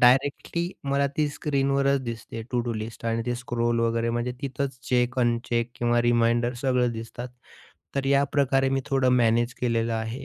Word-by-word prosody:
Directly 140 Hz, +7 st, +3 dB
मला 140 Hz, 0 st, +2 dB
ती 150 Hz, -, +2 dB
स्क्रीनवरच 140 Hz, -1 st, +1 dB
दिसते 115 Hz, -1 st, -6 dB
टू 125 Hz, -, +1 dB
डू 120 Hz, -, 0 dB
लिस्ट 110 Hz, +1 st, -6 dB
आणि 115 Hz, 0 st, 0 dB
ते 120 Hz, -, 0 dB
स्क्रोल 120 Hz, -1 st, -1 dB
वगैरे 115 Hz, 0 st, +1 dB
म्हणजे 120 Hz, +1 st, -1 dB
तिथंच 135 Hz, -1 st, -3 dB
चेक, 125 Hz, 0 st, +1 dB
अनचेक 120 Hz, -1 st, +1 dB
किंवा 120 Hz, 0 st, +1 dB
रिमाइंडर 120 Hz, 0 st, +2 dB
सगळं 125 Hz, -2 st, +2 dB
दिसतात. 115 Hz, +2 st, -6 dB, 0.7 s
तर 140 Hz, -1 st, 0 dB
याप्रकारे 140 Hz, -1 st, +2 dB
मी 135 Hz, 0 st, +1 dB
थोडं 135 Hz, -2 st, +2 dB
मॅनेज 120 Hz, +1 st, +2 dB
केलेलं 115 Hz, -2 st, +1 dB
आहे. 115 Hz, +4 st, -3 dB
120 Hz, 160 wpm, -26 LUFS, 115-135 Hz, 0.7 s, Directly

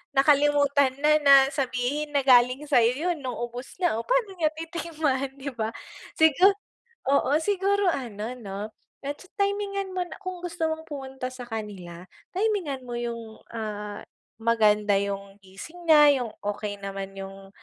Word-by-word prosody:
nakalimutan 285 Hz, -1 st, +4 dB
na, 305 Hz, +1 st, +4 dB
na 280 Hz, -1 st, +9 dB, 0.2 s
sabihin 270 Hz, +2 st, -1 dB
na 285 Hz, -, +2 dB
galing 255 Hz, +2 st, +5 dB
sa'yo 255 Hz, +9 st, +3 dB
yun 320 Hz, -, -10 dB
nung 250 Hz, -2 st, -4 dB
ubos 240 Hz, +5 st, -6 dB
na. 350 Hz, -11 st, +2 dB
O, -, -, -4 dB
paano -, -, +1 dB
niya 320 Hz, -4 st, +2 dB
titikman, 315 Hz, -5 st, -2 dB
'di 275 Hz, +1 st, -4 dB
ba? 220 Hz, -2 st, -1 dB, 0.5 s
Sigu 320 Hz, +5 st, +6 dB, 0.6 s
oo, 280 Hz, -1 st, +3 dB
siguro 400 Hz, 0 st, +2 dB
ano 230 Hz, -6 st, -4 dB
'no, 205 Hz, 0 st, -6 dB, 0.3 s
medyo 290 Hz, +6 st, -6 dB
timingan 400 Hz, -1 st, -1 dB
mo 365 Hz, -, 0 dB
na -, -, -9 dB
kung 370 Hz, -1 st, -5 dB
gusto 340 Hz, -1 st, -4 dB
mong 320 Hz, 0 st, -6 dB
pumunta 265 Hz, -3 st, -6 dB
sa 255 Hz, -1 st, -8 dB
kanila, 195 Hz, -6 st, -7 dB, 0.3 s
timingan 370 Hz, -10 st, -1 dB
mo 240 Hz, -, -5 dB
yung, 230 Hz, -2 st, -6 dB
ah, 210 Hz, -2 st, -5 dB, 0.4 s
maganda 210 Hz, -2 st, +3 dB
yung 200 Hz, 0 st, -4 dB
gising 250 Hz, -, -11 dB
niya, 295 Hz, -3 st, +7 dB
yung 230 Hz, -, -6 dB
okey 205 Hz, 0 st, -3 dB
naman 195 Hz, 0 st, -5 dB
yung, 195 Hz, 0 st, -9 dB
265 Hz, 150 wpm, -26 LUFS, 220-320 Hz, 0.6 s, na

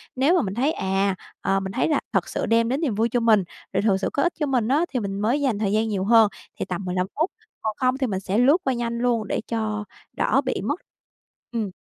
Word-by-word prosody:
Nếu 280 Hz, +8 st, +3 dB
mà 350 Hz, -, +4 dB
mình 190 Hz, -6 st, -3 dB
thấy, 265 Hz, +8 st, +1 dB
à, 195 Hz, -4 st, 0 dB, 0.3 s
ờ, 195 Hz, 0 st, +1 dB
mình 190 Hz, 0 st, -4 dB
thấy -, -, +1 dB
là 305 Hz, -, +2 dB
thật 190 Hz, -4 st, +1 dB
sự -, -, -2 dB
đem 230 Hz, +1 st, +3 dB
đến 270 Hz, +5 st, 0 dB
niềm 260 Hz, -11 st, 0 dB
vui 225 Hz, +2 st, +1 dB
cho 245 Hz, -, +1 dB
mình, 220 Hz, -4 st, +4 dB, 0.3 s
rồi 195 Hz, -, +2 dB
thực 200 Hz, -2 st, +3 dB
sự 195 Hz, -, -1 dB
có 280 Hz, -, +1 dB
ích 350 Hz, -, +1 dB
cho 300 Hz, -, +1 dB
mình 250 Hz, -5 st, +1 dB
á, 295 Hz, +7 st, +3 dB
thì 250 Hz, -, +1 dB
mình 195 Hz, -2 st, -3 dB
mới 235 Hz, +8 st, +1 dB
dành 245 Hz, -7 st, +1 dB
thời 200 Hz, -2 st, 0 dB
gian 220 Hz, +1 st, +2 dB
nhiều 200 Hz, -3 st, -1 dB
hơn 220 Hz, +1 st, +6 dB, 0.3 s
thì -, -, -1 dB
tầm 185 Hz, +1 st, -4 dB
15 180 Hz, 0 st, -1 dB
phút. 320 Hz, +5 st, +2 dB, 0.3 s
Còn 215 Hz, -1 st, -2 dB
không 255 Hz, 0 st, +2 dB
thì 265 Hz, -, 0 dB
mình 195 Hz, -4 st, -2 dB
sẽ 195 Hz, +2 st, -2 dB
lướt 270 Hz, +7 st, +5 dB
qua 265 Hz, -, +1 dB
nhanh 235 Hz, -1 st, -2 dB
luôn 235 Hz, -3 st, +1 dB
để -, -, -1 dB
cho 215 Hz, -2 st, -2 dB, 0.3 s
đỡ -, -, +3 dB
bị -, -, -1 dB
mất -, -, -1 dB, 0.7 s
Ừm. 225 Hz, -4 st, -2 dB
225 Hz, 265 wpm, -24 LUFS, 200-255 Hz, 0.7 s, hơn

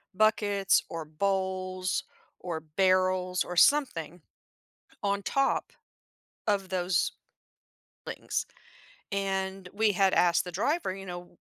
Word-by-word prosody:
buckets 205 Hz, -2 st, +3 dB
or 165 Hz, -1 st, -5 dB
bowls 185 Hz, +2 st, -1 dB, 0.4 s
or 170 Hz, -3 st, -4 dB, 0.2 s
barrels 185 Hz, -1 st, +3 dB
or 180 Hz, -, -6 dB
something 180 Hz, -, +3 dB, 0.8 s
on 200 Hz, 0 st, +1 dB
top 275 Hz, +6 st, +1 dB, 0.8 s
of 200 Hz, -3 st, +1 dB
those 180 Hz, -2 st, +1 dB, 0.9 s
things -, -, -3 dB, 0.7 s
and 190 Hz, -1 st, -2 dB
we 215 Hz, +1 st, +3 dB
had 195 Hz, 0 st, +3 dB
asked 175 Hz, -1 st, +4 dB
the 180 Hz, -, -7 dB
driver, 235 Hz, -, 0 dB
you 195 Hz, 0 st, -9 dB
know, 175 Hz, -1 st, -8 dB
190 Hz, 105 wpm, -29 LUFS, 180-200 Hz, 0.9 s, asked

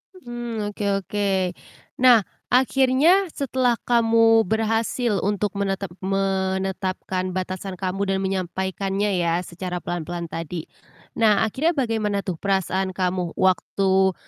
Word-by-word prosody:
Mmm, 240 Hz, -, -5 dB
oke 205 Hz, -, -6 dB, 0.2 s
oke. 205 Hz, +1 st, -1 dB, 0.7 s
Nah, 245 Hz, -4 st, +6 dB, 0.2 s
akhirnya 270 Hz, +9 st, +4 dB
setelah 255 Hz, -3 st, +1 dB
kamu 230 Hz, -1 st, +4 dB
berhasil 225 Hz, +1 st, 0 dB
untuk 205 Hz, 0 st, 0 dB
menetap 195 Hz, -2 st, -2 dB
menetapkan 190 Hz, -1 st, -1 dB
batasan 185 Hz, +1 st, -4 dB
kamu 185 Hz, +1 st, -3 dB
dan -, -, -1 dB
menyampaikannya 190 Hz, +1 st, -1 dB
ya 170 Hz, 0 st, +1 dB
secara 180 Hz, 0 st, -5 dB
pelan-pelan 175 Hz, 0 st, -4 dB
tadi. 165 Hz, 0 st, -5 dB, 0.5 s
Nah, 215 Hz, -3 st, +4 dB
akhirnya 280 Hz, +10 st, +1 dB
bagaimana 220 Hz, -7 st, 0 dB
tuh 185 Hz, -4 st, -4 dB
perasaan 190 Hz, 0 st, 0 dB
kamu 180 Hz, -2 st, -1 dB
waktu, 190 Hz, +1 st, +2 dB
195 Hz, 110 wpm, -23 LUFS, 185-225 Hz, 0.7 s, Nah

